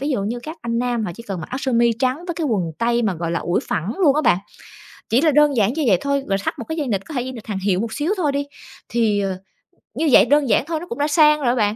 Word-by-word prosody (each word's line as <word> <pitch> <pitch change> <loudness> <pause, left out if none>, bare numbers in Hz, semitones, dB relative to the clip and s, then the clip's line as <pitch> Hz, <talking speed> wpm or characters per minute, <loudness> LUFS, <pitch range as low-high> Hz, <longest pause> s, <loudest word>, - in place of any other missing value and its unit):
ví 285 +2 -2
dụ 250 -8 0
như 225 +5 -3
các 315 +6 -8
anh 230 0 -1
nam, 240 -2 -1
họ - - -3
chỉ 230 - -10
cần 195 -6 -5
mặc 160 - -6
áo 255 - -3
sơ 270 -2 -2
mi 235 0 +3
trắng 255 0 +1
với 345 - -3
cái 325 - -3
quần 190 - -1
tây 235 +1 +1
mà, 205 -5 0
gọi 170 0 -3
là, 170 - 0
ủi 175 - -1
phẳng 180 +7 -2
luôn 300 -8 +4
á - - +3
bạn. 235 - +4 0.7
Chỉ 240 +4 +3
là 315 -1 +4
đơn 295 -1 +4
giản 215 +2 +2
như 315 - -1
vậy 190 - +5
thôi, 280 -1 0
và 195 - +1
thắt - - -3
một 235 - -5
cái 320 - -3
dây 290 -4 -2
nịt, 195 -4 -2
có 320 - -9
thể 255 - -1
dây 260 +1 -5
nịt 230 -4 -10
hàng 205 -3 -3
hiệu 190 -1 0
một 225 0 -3
xíu 305 +6 -1
thôi 300 -5 +1
đi. 280 0 -2 0.4
Thì, 225 -3 +1
ờ, 190 -2 -2 0.6
như 320 - 0
vậy - - +7
đơn 290 -3 +2
giản - - +3
thôi 325 -2 -2
nó 345 - -8
cũng 235 - -6
đã 290 - +1
sang 300 -1 +5
rồi 285 - -4
đó 240 - +3
bạn, 210 -2 +1
240 Hz, 320 wpm, -21 LUFS, 210-290 Hz, 0.7 s, vậy